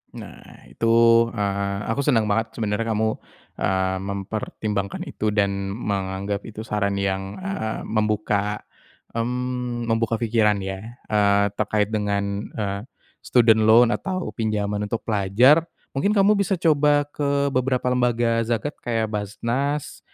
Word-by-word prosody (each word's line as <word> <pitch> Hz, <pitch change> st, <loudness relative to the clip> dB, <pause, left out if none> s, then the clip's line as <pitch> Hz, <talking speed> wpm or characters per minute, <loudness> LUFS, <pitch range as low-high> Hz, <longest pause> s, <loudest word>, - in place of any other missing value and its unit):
Nah, -, -, -12 dB
itu, 115 Hz, -, -2 dB, 0.5 s
eee, 100 Hz, -1 st, -1 dB, 0.2 s
aku 115 Hz, -, -2 dB
senang 115 Hz, -6 st, +2 dB
banget 115 Hz, +1 st, -1 dB
sebenarnya 110 Hz, 0 st, -1 dB
kamu, 110 Hz, +1 st, +1 dB, 0.5 s
eee, 95 Hz, 0 st, 0 dB
mempertimbangkan 100 Hz, +1 st, -4 dB
itu 105 Hz, 0 st, -3 dB
dan 100 Hz, -1 st, 0 dB
menganggap 100 Hz, -1 st, -3 dB
itu 110 Hz, 0 st, -7 dB
saran 100 Hz, -2 st, -1 dB
yang, 95 Hz, 0 st, -2 dB
eee, 195 Hz, -, -3 dB
membuka, 105 Hz, -1 st, -1 dB, 0.5 s
mmm, 125 Hz, 0 st, -2 dB
membuka 115 Hz, 0 st, +1 dB
pikiran 110 Hz, -3 st, +1 dB
ya. 95 Hz, +5 st, -6 dB, 0.2 s
Eee, 100 Hz, -1 st, +3 dB
terkait 105 Hz, 0 st, +1 dB
dengan, 105 Hz, -2 st, 0 dB, 0.3 s
eee, 100 Hz, -2 st, -2 dB, 0.4 s
student 115 Hz, -3 st, +4 dB
loan 115 Hz, +2 st, +6 dB
atau 185 Hz, +4 st, -3 dB
pinjaman 105 Hz, -2 st, -2 dB
untuk 115 Hz, -, -3 dB
pelajar, 115 Hz, -, +4 dB, 0.2 s
mungkin 200 Hz, +10 st, 0 dB
kamu 200 Hz, +1 st, +4 dB
bisa 195 Hz, 0 st, +1 dB
coba 150 Hz, -4 st, +3 dB
ke 140 Hz, -1 st, 0 dB
beberapa 130 Hz, -1 st, 0 dB
lembaga 120 Hz, -2 st, +2 dB
zakat, 120 Hz, +6 st, -2 dB
kayak 115 Hz, -2 st, -2 dB
Baznas 120 Hz, +8 st, -2 dB
110 Hz, 125 wpm, -23 LUFS, 100-125 Hz, 0.5 s, loan